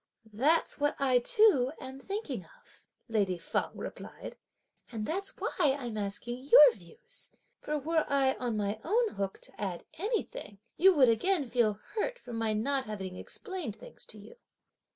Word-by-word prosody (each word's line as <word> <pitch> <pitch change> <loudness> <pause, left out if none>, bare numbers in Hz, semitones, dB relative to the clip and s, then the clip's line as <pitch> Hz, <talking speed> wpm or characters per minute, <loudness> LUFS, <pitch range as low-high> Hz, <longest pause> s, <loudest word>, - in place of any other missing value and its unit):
"That's 290 +11 +2
what 290 0 +1
I 260 -2 +3
too 310 - +4
am 265 +1 -8
thinking 400 +9 -4 0.2
of," - - -18 0.3
lady 200 -6 +1
Feng 165 - -2
replied, - - -8 0.6
"and 220 -3 -3
that's 385 - -2
why - - -2
I'm 265 -5 +1
asking 215 +4 -4
your 290 -1 +9
views; 175 -7 -9 0.3
for 300 0 -2
were 315 +2 0
I, 270 -1 +3
on 240 -3 -1
my 205 +1 -1
own 450 +6 +2
hook, 195 - -4
to - - -12
add 185 -4 -3
anything 440 - -3 0.2
you 380 +1 +6
would 260 -5 +6
again 295 - +2
feel 230 -4 +1
hurt - - -1
for 245 - -10
my 225 -1 0
not 265 +5 +1
have 215 -1 -5
explained 215 - -5
things - - -13
to - - -6
you." 475 - -13
260 Hz, 160 wpm, -31 LUFS, 215-335 Hz, 0.6 s, your